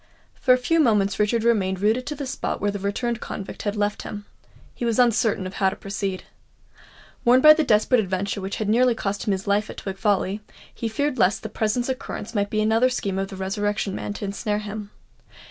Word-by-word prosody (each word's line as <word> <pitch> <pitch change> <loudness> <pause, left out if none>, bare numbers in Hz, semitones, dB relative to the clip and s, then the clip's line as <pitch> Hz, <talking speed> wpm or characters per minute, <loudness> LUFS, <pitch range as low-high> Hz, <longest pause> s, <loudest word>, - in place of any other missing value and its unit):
For 255 - +1
a 250 - +7
few 330 +7 +1
moments 210 -8 +2
Richard 220 +2 +2
remained 195 -5 +2
rooted 220 +5 +1
to 295 - -3
the 280 - -5
spot 255 - -3
where 205 - 0
the 200 - -5
returned 220 +4 -2
convict 195 - -6
had 205 -1 -2
left 205 0 -1
him. 205 -1 -7 0.5
He - - -7
was 230 -2 +1
uncertain 230 -5 +2
how 190 +1 +1
to 190 - -6
proceed. 195 -1 -4 1.0
Warned 250 +2 +5
by 305 0 +11
the 315 0 +1
desperate 230 0 +3
adventure 195 0 -2
which 190 +1 -4
had 215 - -3
nearly 240 +3 +3
cost 200 -1 -3
him - - +3
his 195 +2 -2
life 205 +1 +1
at - - -8
Twig 195 -1 -5
Folly, 200 0 +1 0.3
he 230 - -3
feared 275 +3 -1
lest 190 +1 +2
the 220 - -4
present 220 +3 -1
occurrence 255 -4 -5
might 205 -2 0
be 215 - 0
another 225 +4 +3
scheme 200 -6 -2
of 195 - -1
the 195 - -9
Resurrection 200 +1 -2
Man - - -4
to 205 - -5
ensnare 205 +1 -2
him. 210 0 -6
210 Hz, 215 wpm, -24 LUFS, 200-235 Hz, 1.0 s, by